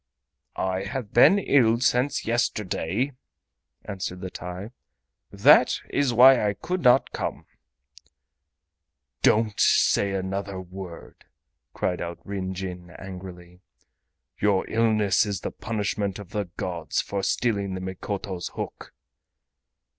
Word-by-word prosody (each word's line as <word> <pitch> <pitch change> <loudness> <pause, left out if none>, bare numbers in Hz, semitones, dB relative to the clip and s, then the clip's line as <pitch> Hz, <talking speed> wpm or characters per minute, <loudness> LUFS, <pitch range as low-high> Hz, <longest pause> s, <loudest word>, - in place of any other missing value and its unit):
"I 95 0 -1
have 110 +1 -5
been 150 +11 +7
ill 120 - +3
since 125 +3 +1
yesterday," 110 - -1 0.7
answered 95 -3 -5
the 95 -1 -6
TAI; 90 +5 -7 0.6
"that - - +5
is 140 -3 +1
why 125 +1 +7
I 100 - -3
could 180 +1 -3
not 125 -1 +4
come." - - -4 1.8
"Don't 110 -1 +2
say 100 -1 +3
another 95 0 -3
word!" 90 -2 -10 0.5
cried 90 - -1
out 85 0 -5
Ryn 95 -2 -4
Jin 90 -2 -6
angrily. 90 -2 -10 0.8
"Your 100 -2 +2
illness 110 -4 +2
is 100 -2 -3
the - - -4
punishment 105 -3 -3
of 100 -4 -11
the 105 -1 -2
gods 85 -3 -3
for 100 -1 -2
stealing 100 -4 0
the - - -4
Mikoto's 95 0 -5
hook." - - -7
100 Hz, 115 wpm, -25 LUFS, 95-115 Hz, 1.8 s, been